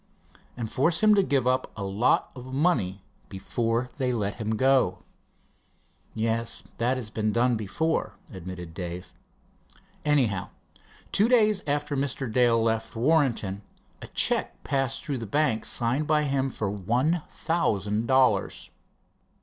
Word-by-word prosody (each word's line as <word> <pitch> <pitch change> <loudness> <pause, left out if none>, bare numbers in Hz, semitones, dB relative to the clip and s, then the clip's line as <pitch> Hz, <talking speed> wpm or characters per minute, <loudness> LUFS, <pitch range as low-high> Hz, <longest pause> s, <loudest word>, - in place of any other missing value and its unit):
"And 120 -2 -3
force 160 - +1
him 215 0 +7
to 200 - +5
give 140 -9 +1
up 130 +1 +1
a 100 - -4
lot 100 +6 +1
of 130 0 -9
money 130 - 0 0.3
before 115 +5 -1
they 130 -3 0
let 105 -4 -2
him 110 -1 -2
go." 135 +3 +2 1.1
"Yes, 115 +1 -1 0.2
that 125 +3 +1
has 110 -4 -5
been 110 -1 0
done 120 +2 +2
before," 115 +10 -1 0.2
admitted 90 -2 -8
Dave. 90 0 -6 0.9
"Anyhow, 125 -11 +1 0.6
two 210 +4 +3
days 215 -5 +4
alter 145 0 -1
Mr. 135 -3 -2
Dale 120 -1 +4
left 110 0 -1
Warrenton, 120 -7 +1 0.4
a - - -8
check - - 0
passed 135 -1 -1
through 140 -4 -2
the 115 - -6
bank 130 -2 +1
signed 125 +6 0
by 150 -1 +3
him 135 -2 0
for 110 -5 -3
one 125 - 0
thousand 110 - -1
dollars." 130 -7 +2
125 Hz, 135 wpm, -26 LUFS, 110-140 Hz, 1.1 s, him